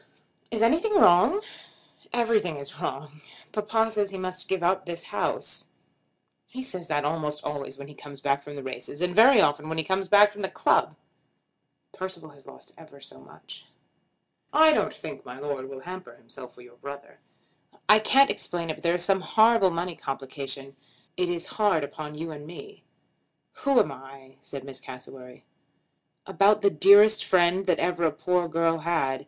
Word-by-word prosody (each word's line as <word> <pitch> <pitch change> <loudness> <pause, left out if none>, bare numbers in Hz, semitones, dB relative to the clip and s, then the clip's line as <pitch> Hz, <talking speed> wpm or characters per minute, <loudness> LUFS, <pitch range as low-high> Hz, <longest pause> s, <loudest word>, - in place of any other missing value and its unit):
"Is 225 -1 -1
anything 335 - +2
wrong?" 340 - +5 0.7
"Everything 225 -8 +1
is 140 0 -10
wrong. 150 +3 -6 0.3
Papa 220 +1 0
says 205 -2 -1
he 195 - -7
must 185 0 -5
give 190 -2 -2
up 185 +1 0
this 170 -1 -5
house." - - -3 0.8
"He 260 +1 -7
says 185 -9 -6
that 145 -3 -1
almost 150 -1 -3
always 140 -2 -5
when 140 0 -10
he 150 - -13
comes 145 -1 -12
back 140 0 0
from 145 +1 -10
the 140 - -8
races, 130 +2 -8
and 180 0 -2
very 235 +2 +7
often 150 -2 0
when 160 - -4
he 160 - +1
comes 190 +3 -1
back 205 +2 +6
from 205 0 -10
the 190 - -2
club." - - +1 1.0
"Percival 185 -4 -8
has 140 -1 -21
lost - - -14
ever 155 -4 -16
so 140 - -14
much." - - -14 0.8
"I 315 +1 +6
don't - - +1
think - - -9
my 125 +1 -10
Lord 140 -2 -5
will 135 -1 -9
hamper 185 +3 -9
himself 125 +2 -14
for - - -15
your 120 0 -18
brother." 140 +1 -10 0.7
"I 210 +1 +7
can't 270 +5 +4
explain 170 -2 -4
it, - - -8
but - - -15
there 170 0 +2
is 175 0 -1
some 195 -1 +2
horrible 220 0 +4
money 170 0 -4
complication. 135 0 -7 0.4
It 180 -1 -1
is 175 0 -3 0.2
hard 190 -8 +3
upon 150 +1 -7
you 160 +2 -6
and 150 -1 -10
me." 410 - -12 0.7
"Who 275 -2 +2
am - - +1
I?" 135 0 -13
said 140 -2 -9
Miss 135 -1 -10
Cassewary. 125 0 -12 0.8
"About 205 +1 +3
the 200 -1 +3
dearest 210 +2 +6
friend 185 +1 +2
that 180 - +2
ever 175 0 -1
a 160 - +3
poor 180 +3 -1
girl 165 0 0
had. 155 -5 -1
170 Hz, 180 wpm, -26 LUFS, 140-195 Hz, 1.0 s, very